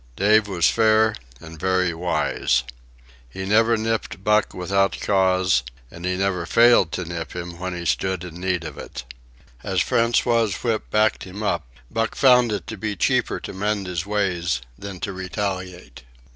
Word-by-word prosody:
Dave 105 +1 +4
was 90 -4 +2
fair 110 -1 +3 0.3
and 80 -1 -11
very 95 0 +1
wise. 80 -6 0 0.7
He 95 +10 -6
never 115 +3 +3
nipped 110 -3 -3
Buck 105 +1 +2
without 95 +2 0
cause, 95 -7 +2 0.3
and 85 +1 -8
he 90 0 -1
never 90 -3 -1
failed 115 -8 +5
to 90 - -3
nip 85 0 -6
him 85 -1 -6
when 90 0 -4
he 85 - -6
stood 95 +1 0
in 90 0 -9
need 90 -2 -1
of 75 -3 -8
it. - - -8 0.6
As - - -1
François's 115 -3 +2
whip 115 -2 -1
backed 110 0 +1
him 95 +3 -7
up, 85 -9 -1 0.2
Buck 115 0 -1
found 125 -3 +5
it 100 -5 -3
to 115 - -7
be 105 +1 -3
cheaper - - +1
to - - -7
mend 100 +1 -1
his 90 -2 -3
ways 95 -6 -1
than 95 +6 -8
to 100 - -3
retaliate. 95 -1 -5
95 Hz, 165 wpm, -23 LUFS, 90-110 Hz, 0.7 s, failed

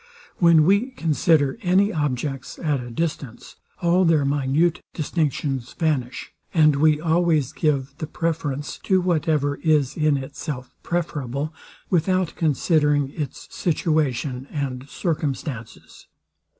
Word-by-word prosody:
When 170 -3 +5
we 200 +7 +3
consider 160 - +1
any 195 +2 +3
objects 135 -3 -2
at 150 -4 0
a 120 0 -7
distance, 140 -3 -4 0.3
all 175 +2 +4
their 160 -5 +3
minute 145 +5 +1
distinctions 145 -5 -2
vanish, 145 -7 -2 0.2
and 155 -3 +5
we 150 +1 +4
always 160 -4 +1
give 140 -4 0
the 155 - -4
preference 150 -4 -3
to 190 -1 +2
whatever 155 -5 +1
is 150 -4 +2
in 150 -2 +2
itself 135 -1 -6
preferable, 150 -3 -3 0.4
without 185 0 +1
considering 150 -2 +2
its 145 -4 -6
situation 145 -6 0
and 135 -2 -4
circumstances. 145 - -4
150 Hz, 110 wpm, -23 LUFS, 140-165 Hz, 0.4 s, When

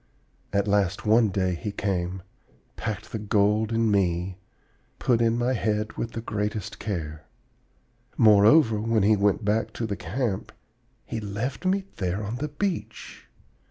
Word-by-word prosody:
At 100 +1 +1
last 100 -1 +1
one 110 +1 +4
day 95 -1 0
he 105 +5 -4
came, 95 -2 -2 0.5
packed 110 -5 -5
the 110 - -3
gold 105 +1 +2
in 115 -1 +2
me, 90 -4 +2
and 95 -1 -7 0.6
put 120 -2 +2
in 115 0 +2
my 120 +2 +1
head 105 -1 -1
with 115 - -4
the 115 - -4
greatest 105 -1 -3
care. 80 -7 -5 0.9
Moreover, 110 +2 +6
when 110 -2 +1
he 105 +2 +5
went 100 +1 +1
back 105 +2 0
to 115 - -3
the 105 -2 -2
camp, 100 +3 -3 0.5
he 115 - -4
left 110 - -3
me 190 +1 +1
there 95 +2 -2
on 105 +4 -4
the 150 +4 -2
beach! 145 - -4
105 Hz, 155 wpm, -26 LUFS, 100-115 Hz, 0.9 s, Moreover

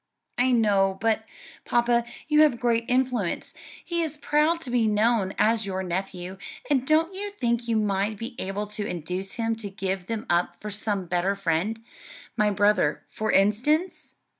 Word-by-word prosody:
"I 255 +1 +4
know; 200 -5 +3
but, 225 0 0 0.4
papa, 240 0 +2 0.2
you 300 0 +5
have 295 -6 +4
great 235 -2 +1
influence; 250 -7 0 0.3
he 340 -1 -1
is 310 -2 -3
proud 300 +3 +2
to 255 - -6
be 240 -3 +2
known 210 -2 +2
as 220 -1 +2
your 190 -1 -2
nephew; 185 +1 -4 0.3
and 265 -2 +2
don't 320 +4 +3
you 405 +2 -3
think 235 - -1
you 230 - +1
might 210 0 0
be 235 +4 -6
able 195 +2 -2
to 210 0 -4
induce 180 +2 -4
him 225 -1 -1
to 215 -3 -6
give 190 -2 -3
them 225 -1 -3
up 175 0 0
for 210 - -6
some 205 -2 -2
better 180 +3 0
friend; 195 +4 -1 0.5
my 210 -2 +3
brother, 205 +1 +2
for 215 0 -1
instance? 250 - +1
220 Hz, 165 wpm, -26 LUFS, 195-245 Hz, 0.5 s, you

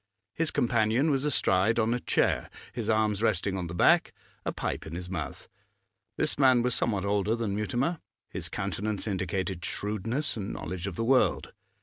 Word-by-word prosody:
His 165 +3 0
companion 120 +5 +2
was 135 0 +1
astride 110 -6 +2
on 115 0 +2
a 125 - -1
chair, - - +1 0.2
his 115 -3 -3
arms 110 -2 +2
resting 100 -3 +1
on 90 -2 -3
the 85 - -6
back, - - +4 0.3
a - - -1
pipe - - -4
in 80 - -6
his 90 +1 -6
mouth. 80 -8 -5 0.7
This - - 0
man 130 -3 +5
was 125 0 +1
somewhat 100 -5 0
older 100 +2 +1
than 115 -4 -2
Mutimer; 125 - -1 0.3
his - - -2
countenance 105 0 -2
indicated 95 -2 -2
shrewdness 110 +10 -2
and 105 -1 -4
knowledge 90 +2 -5
of 95 - -5
the 115 - -1
world. 130 +1 +2
110 Hz, 175 wpm, -28 LUFS, 95-120 Hz, 0.7 s, man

